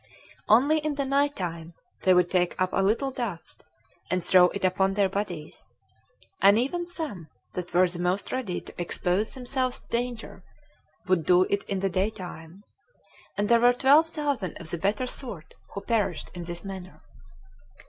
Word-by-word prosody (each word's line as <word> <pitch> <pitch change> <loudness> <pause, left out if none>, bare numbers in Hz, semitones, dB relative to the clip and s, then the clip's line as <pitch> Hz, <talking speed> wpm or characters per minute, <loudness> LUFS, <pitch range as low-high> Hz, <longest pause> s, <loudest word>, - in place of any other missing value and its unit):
Only 275 +9 +5
in 305 -1 -2
the 280 -1 -1
night 280 +2 +1
time 170 -2 -5 0.3
they 185 -1 +6
would 180 -1 +3
take 180 -1 +1
up 185 0 +1
a 195 - +2
little 230 +8 +1
dust, 230 -10 -6 0.5
and 185 -1 0
throw 180 0 +6
it 190 +2 -1
upon 190 +1 +1
their 200 -1 +3
bodies; 185 -6 -5 0.7
and 200 +2 +6
even 345 +9 -1
some 300 - -5 0.3
that 180 -1 -5
were 180 +1 +4
the 175 0 -6
most 180 +3 -1
ready 235 -9 -3
to - - -9
expose 180 +4 -1
themselves 255 0 -1
to - - -26
danger 235 -5 -4 0.6
would 185 -4 +2
do 180 +3 +5
it 200 - +1
in 195 -1 -3
the 195 - +1
day 190 +4 +1
time: 180 -2 -10 0.7
and 205 +1 +1
there 235 +1 +5
were 245 +1 +5
twelve 285 +6 +5
thousand 285 - -2
of 165 -2 -5
the 170 - -3
better 205 +7 0
sort 235 - -5 0.2
who 200 - -4
perished 210 -8 -1
in 175 -1 -7
this 175 +2 -3
manner. 190 -2 -9
195 Hz, 175 wpm, -26 LUFS, 180-245 Hz, 0.7 s, they